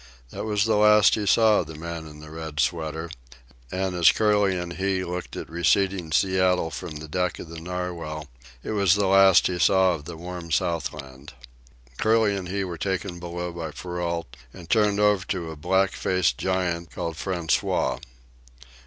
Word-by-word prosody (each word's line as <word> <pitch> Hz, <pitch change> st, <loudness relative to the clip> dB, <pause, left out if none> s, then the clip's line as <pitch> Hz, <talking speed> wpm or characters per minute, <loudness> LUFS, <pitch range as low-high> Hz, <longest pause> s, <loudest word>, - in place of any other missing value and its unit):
That -, -, -5 dB
was 105 Hz, -1 st, +1 dB
the 110 Hz, -2 st, +2 dB
last 105 Hz, 0 st, +6 dB
he 105 Hz, -2 st, -1 dB
saw 110 Hz, +1 st, +5 dB
of 85 Hz, -, -3 dB
the 80 Hz, -, -9 dB
man 85 Hz, 0 st, -6 dB
in 75 Hz, 0 st, -12 dB
the 75 Hz, 0 st, -11 dB
red 80 Hz, -2 st, -7 dB
sweater, 80 Hz, +2 st, -1 dB, 0.6 s
and 95 Hz, 0 st, -2 dB
as 85 Hz, -3 st, +6 dB
Curly 105 Hz, -3 st, +2 dB
and 90 Hz, -1 st, -5 dB
he 95 Hz, 0 st, -1 dB
looked 90 Hz, +1 st, -5 dB
at -, -, -6 dB
receding 85 Hz, +1 st, +1 dB
Seattle 90 Hz, 0 st, +2 dB
from 80 Hz, +2 st, -7 dB
the 80 Hz, +1 st, -8 dB
deck 90 Hz, +3 st, -1 dB
of 80 Hz, -, -9 dB
the 85 Hz, 0 st, -8 dB
Narwhal, 85 Hz, -3 st, -5 dB, 0.4 s
it -, -, -4 dB
was 100 Hz, -3 st, +3 dB
the 105 Hz, -1 st, +1 dB
last 95 Hz, -1 st, +6 dB
he 90 Hz, -1 st, -1 dB
saw 95 Hz, -1 st, +4 dB
of 75 Hz, -4 st, -7 dB
the 85 Hz, 0 st, -8 dB
warm 90 Hz, 0 st, -7 dB
Southland. 75 Hz, -4 st, -3 dB, 0.7 s
Curly 110 Hz, -2 st, +3 dB
and 95 Hz, -2 st, -5 dB
he 100 Hz, +1 st, -1 dB
were 85 Hz, -3 st, -6 dB
taken 95 Hz, -1 st, -3 dB
below 85 Hz, 0 st, -5 dB
by 85 Hz, -2 st, -5 dB
Perrault 85 Hz, -3 st, -4 dB, 0.2 s
and 85 Hz, +3 st, -12 dB
turned 105 Hz, 0 st, +2 dB
over 105 Hz, -3 st, +3 dB
to 85 Hz, -4 st, -3 dB
a -, -, -8 dB
black 95 Hz, +5 st, +1 dB
faced 90 Hz, -9 st, 0 dB
giant 90 Hz, -2 st, -1 dB
called 85 Hz, -, -4 dB
François. 85 Hz, +1 st, -1 dB
90 Hz, 180 wpm, -25 LUFS, 80-95 Hz, 0.7 s, last